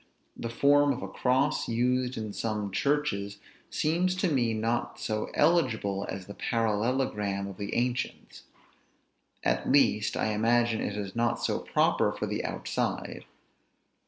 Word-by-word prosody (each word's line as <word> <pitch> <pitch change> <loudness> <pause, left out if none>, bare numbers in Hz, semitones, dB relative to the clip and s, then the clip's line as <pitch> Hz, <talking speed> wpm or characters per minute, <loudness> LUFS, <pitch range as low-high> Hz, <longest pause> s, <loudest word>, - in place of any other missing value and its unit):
The 115 - -5
form 145 +4 +4
of 125 - -6
a - - -3
cross 130 +3 +1
used 125 +2 +1
in 110 -2 -4
some 105 -3 -2
churches 100 -7 0 0.3
seems 175 +4 +1
to 185 0 +1
me 120 -5 +2
not 115 +2 -1
so 110 -1 -2
eligible 125 - +2
as 95 -1 -5
the 100 - -8
parallelogram 105 -3 0
of 100 -2 -8
the 100 -1 -4
ancients; 125 +1 -2 1.0
at - - +1
least, 105 -6 +3
I 110 - 0
imagine 115 +1 +2
it 100 - -3
is 100 -1 -5
not 120 0 +2
so - - 0
proper - - +2
for - - -3
the - - -3
outside. - - -3
115 Hz, 140 wpm, -29 LUFS, 105-130 Hz, 1.0 s, form